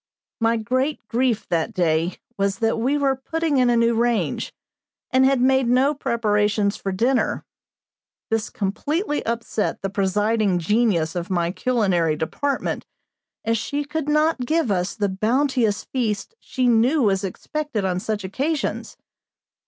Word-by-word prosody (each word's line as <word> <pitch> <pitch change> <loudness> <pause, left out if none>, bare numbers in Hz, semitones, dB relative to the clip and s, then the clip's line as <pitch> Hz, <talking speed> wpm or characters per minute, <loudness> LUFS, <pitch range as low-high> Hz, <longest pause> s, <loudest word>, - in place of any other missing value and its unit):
My 230 0 +2
great 255 +4 -1
grief 245 -2 0
that 165 +1 -1
day 170 -1 +1 0.2
was 200 0 0
that 225 +1 0
we 265 +6 +1
were 275 -2 +2
putting 320 +2 -1
in 250 -1 +4
a 240 - +3
new 230 0 +3
range, 235 0 0 0.6
and 260 0 +4
had 270 -1 +2
made 265 0 +3
no 260 +4 +3
preparations 210 -5 +1
for 195 - -4
dinner. 240 +7 0 0.9
This 225 -1 0
completely 295 - -2
upset 230 -3 -2
the 195 - -2
presiding 205 0 +1
genius 175 -3 +1
of 175 -1 -4
my 175 -2 0
culinary 190 -9 +1
department, 220 - -2 0.6
as 225 0 +1
she 290 +5 -3
could 300 0 -3
not 305 0 +2
give 315 -7 +1
us 180 0 -1
the 205 -3 0
bounteous 225 +2 +1
feast 225 - -2
she 255 -2 -1
knew 245 +5 +3
was 195 -2 +2
expected 245 - -3
on 180 -1 0
such 210 0 -3
occasions. 275 - -2
230 Hz, 145 wpm, -22 LUFS, 200-265 Hz, 0.9 s, in